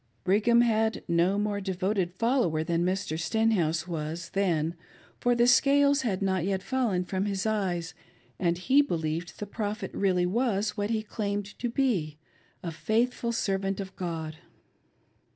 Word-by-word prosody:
Brigham 215 Hz, +5 st, +4 dB
had 225 Hz, -1 st, +1 dB
no 175 Hz, +3 st, +2 dB
more 205 Hz, -1 st, -1 dB
devoted 190 Hz, -1 st, -1 dB
follower 230 Hz, -, +1 dB
than 170 Hz, +1 st, 0 dB
Mr. 180 Hz, -3 st, -1 dB
Stenhouse 175 Hz, -5 st, +1 dB
was 165 Hz, 0 st, -4 dB
then, 170 Hz, -5 st, +1 dB, 0.5 s
for 245 Hz, 0 st, +2 dB
the 240 Hz, 0 st, +4 dB
scales 280 Hz, +3 st, +4 dB
had 200 Hz, -6 st, -1 dB
not 190 Hz, -3 st, +1 dB
yet 190 Hz, 0 st, -1 dB
fallen 230 Hz, -9 st, 0 dB
from 190 Hz, +1 st, -2 dB
his 195 Hz, -1 st, -2 dB
eyes, 185 Hz, -6 st, -1 dB, 0.5 s
and 175 Hz, -2 st, +1 dB
he 260 Hz, +10 st, +4 dB
believed 165 Hz, -, -3 dB
the 210 Hz, -, -4 dB
•Prophet 205 Hz, -1 st, -4 dB
was -, -, -5 dB
really 180 Hz, -3 st, +3 dB
what 210 Hz, 0 st, 0 dB
he 220 Hz, -1 st, 0 dB
claimed 205 Hz, -1 st, -3 dB
to 240 Hz, -, -1 dB
be 210 Hz, -, 0 dB, 0.2 s
— -, -, -36 dB
a 170 Hz, -, -3 dB
faithful 230 Hz, +9 st, 0 dB
servant 195 Hz, -3 st, -1 dB
of 190 Hz, -1 st, -6 dB
God. 160 Hz, -3 st, -4 dB
195 Hz, 150 wpm, -28 LUFS, 175-225 Hz, 0.5 s, Brigham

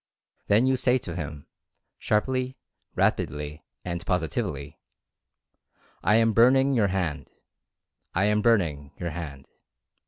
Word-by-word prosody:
Then 110 Hz, +5 st, +4 dB
you 130 Hz, 0 st, +2 dB
say 125 Hz, +1 st, +3 dB
to 85 Hz, -9 st, -6 dB
him, 75 Hz, -4 st, -6 dB, 0.5 s
sharply, 130 Hz, +4 st, 0 dB, 0.4 s
rapidly 75 Hz, 0 st, -1 dB, 0.2 s
and 85 Hz, -1 st, -3 dB
positively: 75 Hz, -4 st, -2 dB, 1.2 s
"I 105 Hz, -, +4 dB
am 115 Hz, 0 st, +4 dB
burning 130 Hz, +4 st, +5 dB
your 110 Hz, -5 st, +3 dB
hand 90 Hz, -5 st, -2 dB, 0.4 s
— -, -, -40 dB
I 95 Hz, +3 st, +3 dB
am 105 Hz, 0 st, +2 dB
burning 80 Hz, -11 st, +1 dB
your 85 Hz, -1 st, -4 dB
hand. 75 Hz, -5 st, -7 dB
90 Hz, 120 wpm, -26 LUFS, 75-115 Hz, 1.2 s, burning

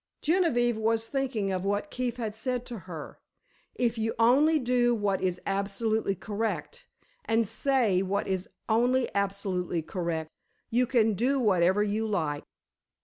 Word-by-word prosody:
Genevieve 265 Hz, -9 st, +2 dB
was 225 Hz, +1 st, +1 dB
thinking 250 Hz, -8 st, -1 dB
of 185 Hz, -1 st, -2 dB
what 205 Hz, +9 st, -1 dB
Keefe 245 Hz, -1 st, -2 dB
had 220 Hz, -3 st, -3 dB
said 250 Hz, +2 st, -2 dB
to 235 Hz, -3 st, -6 dB
her: 160 Hz, -4 st, -8 dB, 0.6 s
"If 235 Hz, -2 st, 0 dB
you 220 Hz, +1 st, 0 dB
do -, -, -19 dB
only 250 Hz, 0 st, +4 dB
what 205 Hz, -5 st, 0 dB
is 180 Hz, -2 st, 0 dB
absolutely 200 Hz, +1 st, 0 dB
correct 225 Hz, -, -4 dB, 0.4 s
and 225 Hz, -1 st, +2 dB
say 225 Hz, -4 st, +2 dB
what 200 Hz, +2 st, -1 dB
is 190 Hz, -1 st, -2 dB, 0.2 s
only 245 Hz, +3 st, +2 dB
absolutely 195 Hz, -4 st, -1 dB
correct, 165 Hz, -2 st, -3 dB, 0.4 s
you 245 Hz, +2 st, +2 dB
can 225 Hz, -3 st, +3 dB
do 255 Hz, +7 st, +1 dB
whatever 190 Hz, -3 st, +3 dB
you 215 Hz, +2 st, -1 dB
like." 155 Hz, -8 st, -1 dB
220 Hz, 145 wpm, -28 LUFS, 195-245 Hz, 0.6 s, only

